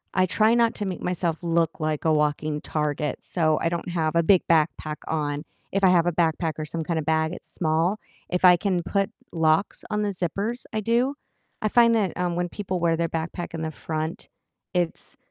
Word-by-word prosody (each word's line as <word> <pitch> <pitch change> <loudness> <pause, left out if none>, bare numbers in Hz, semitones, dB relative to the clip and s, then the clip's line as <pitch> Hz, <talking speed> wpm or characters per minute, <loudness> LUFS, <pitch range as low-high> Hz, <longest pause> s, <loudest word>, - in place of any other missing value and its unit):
I 185 0 +4
try 220 +4 +3
not 235 -1 +3
to 205 - -3
make 185 -3 -4
myself 170 -2 -1
look 165 -1 0
like 155 0 -2
a 160 - +4
walking 150 0 0
target, 150 -1 -2
so, 155 -3 +1
I 165 - +2
don't 170 +1 -3
have 165 -2 -1
a 170 - +4
big 185 +1 +5
backpack 155 -1 +1
on, 150 -1 -1 0.3
if 195 0 -1
I 185 - +7
have 175 -2 +4
a - - +3
backpack, 160 -1 +1
or 155 - -2
some 165 +1 -4
kind 165 0 -2
of 150 - -4
bag, 160 +1 +1
it's - - -8
small, 165 +5 +1 0.3
if 180 +1 +1
I 180 -1 +9
can 185 -3 0
put 195 +1 0 0.2
locks 160 +3 +1
on 210 0 0
the 205 - 0
zippers, 200 +6 -3
I 215 - 0
do, 240 +6 +1 0.5
I 215 - +1
find 235 0 +5
that, 200 -6 +1
um, 175 -1 -1
when 175 0 0
people 190 -2 -3
wear 165 -1 +2
their 165 -1 0
backpack 165 +2 -4
in 160 - -4
the 160 - -2
front, 155 +1 -4 0.4
it's 175 -2 -2
170 Hz, 210 wpm, -25 LUFS, 160-190 Hz, 0.5 s, I